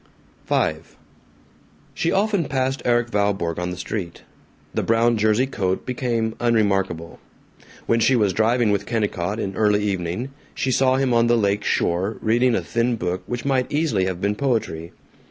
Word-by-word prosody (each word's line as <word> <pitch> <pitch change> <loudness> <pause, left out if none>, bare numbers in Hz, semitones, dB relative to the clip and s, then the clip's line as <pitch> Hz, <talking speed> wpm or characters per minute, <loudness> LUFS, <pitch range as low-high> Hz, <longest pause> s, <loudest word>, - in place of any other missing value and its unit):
V - - +2 1.2
She - - 0
often 200 -3 +1
passed 135 0 -1
Erik 120 -1 +2
Valborg 95 -5 0
on 90 0 -2
the 90 - -5
street; 90 -1 -5 0.5
the - - 0
brown 115 +1 +2
jersey 110 +3 +2
coat 95 -8 -2
became 120 -3 -1
unremarkable. 95 -8 0 0.7
When 115 - +2
she 115 +4 +4
was 105 -5 +2
driving 115 +1 +2
with 100 0 -1
Kennicott, 105 -3 -1
in 95 -3 -3
early 105 -1 +2
evening, 95 +5 -2 0.2
she 130 - -1
saw 130 0 +3
him 130 -2 +1
on 115 0 +4
the 120 0 +4
lake 100 -1 +1
shore, 95 +6 0
reading 120 +2 +2
a - - 0
thin 120 +1 0
book 90 -3 -3
which 120 +1 -4
might 130 -2 0
easily 145 - +1
have 95 -2 -3
been 100 +2 0
poetry. 110 -10 -2
110 Hz, 160 wpm, -22 LUFS, 95-120 Hz, 1.2 s, she